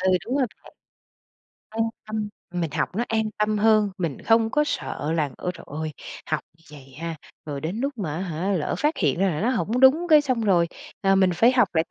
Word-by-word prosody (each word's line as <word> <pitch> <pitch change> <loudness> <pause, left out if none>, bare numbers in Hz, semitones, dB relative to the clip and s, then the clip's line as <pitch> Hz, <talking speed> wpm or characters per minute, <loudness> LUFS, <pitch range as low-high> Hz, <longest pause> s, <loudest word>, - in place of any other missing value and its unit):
Ừ, 190 0 +2
đúng 255 +4 -1
rồi 270 -3 +2 0.2
bạn. - - -15 1.0
An 225 +1 -1 0.2
tâm, 215 -1 -3 0.2
mình 175 -3 -2
học - - 0
nó 235 - +1
an 220 -1 +1 0.2
tâm 210 0 +1
hơn, 215 -1 +4
mình 165 -7 -3
không 225 0 +3
có 300 - +3
sợ 155 - -3
là, 155 -4 0
ơ 180 - -3
trời - - -12
ơi, 155 +1 -4 0.3
học 155 - 0 0.2
như 165 - -25
vậy 135 -3 -13
ha, 165 0 -4 0.3
rồi 145 -2 -4
đến 175 +9 -3
lúc 275 -1 -2
mà 160 -8 -3
á 170 - -3
hả, 180 +2 -2
lỡ 175 -6 -1
phát 300 +2 +1
hiện 155 -3 +1
ra 195 +1 +3
là 155 - -3
nó 230 +5 +2
hổng 245 -1 0
đúng 290 +7 +6
cái 305 -2 +8
xong 255 -5 -1
rồi, 180 -6 +3 0.3
ờ, 195 0 +3
mình 190 -1 +4
phải 230 +8 +5
học 250 -6 +4
lại 160 0 +3
195 Hz, 230 wpm, -24 LUFS, 165-230 Hz, 1.0 s, cái